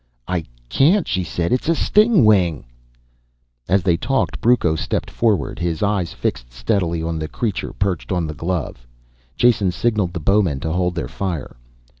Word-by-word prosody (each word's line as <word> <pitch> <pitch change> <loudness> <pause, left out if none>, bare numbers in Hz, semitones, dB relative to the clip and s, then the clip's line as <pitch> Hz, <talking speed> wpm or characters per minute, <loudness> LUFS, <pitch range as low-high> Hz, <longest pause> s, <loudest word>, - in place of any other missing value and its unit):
"I 90 -3 -2 0.2
can't," 155 - +3
she 95 -2 -1
said. 85 +2 -2
"It's 130 +5 0
a 165 - +3
stingwing!" 110 - +3 1.0
As 95 -1 +3
they 85 -3 +2
talked 135 +8 -1
Brucco 115 -9 +3
stepped - - -3
forward, 110 -9 0
his 85 +1 -2
eyes 100 -5 0
fixed - - -4
steadily 80 +7 -1
on 80 -1 -2
the 80 - -3
creature 105 +4 -3
perched 100 -2 -2
on 90 -3 0
the 75 - -4
glove. 80 -6 -4 0.5
Jason 115 -6 +3
signaled 105 -2 0
the 90 - -3
bowmen 90 -4 +2
to 80 - -2
hold 90 +1 0
their 80 -8 -3
fire. 90 +2 -4
90 Hz, 160 wpm, -20 LUFS, 80-105 Hz, 1.0 s, can't